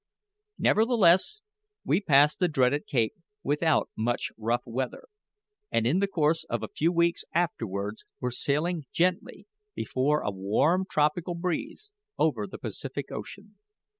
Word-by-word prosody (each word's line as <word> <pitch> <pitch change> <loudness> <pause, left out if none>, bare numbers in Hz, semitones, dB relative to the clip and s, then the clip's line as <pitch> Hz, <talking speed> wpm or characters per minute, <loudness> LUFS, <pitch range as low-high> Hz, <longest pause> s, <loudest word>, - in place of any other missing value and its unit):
Nevertheless 220 - +3 0.4
we 175 - +2
passed 145 -4 +4
the 180 - +3
dreaded 145 -1 +1
cape 115 -5 +1 0.3
without 150 +1 +1
much 120 +2 -1
rough 115 +2 -1
weather, 125 +2 -4 0.7
and 115 - +1
in 150 +10 +2
the 200 - +2
course 160 -3 +1
of - - -3
a - - -2
few 165 +3 +2
weeks 170 0 +1
afterwards 110 - -2
were 125 - -2
sailing 150 +5 -1
gently, 180 +1 0 0.3
before 145 +4 0
a 105 - -1
warm 120 - +1
tropical 155 +4 +1
breeze, 240 - -4 0.2
over - - +1
the - - -9
Pacific - - -6
Ocean. - - -9
150 Hz, 135 wpm, -28 LUFS, 125-175 Hz, 0.7 s, passed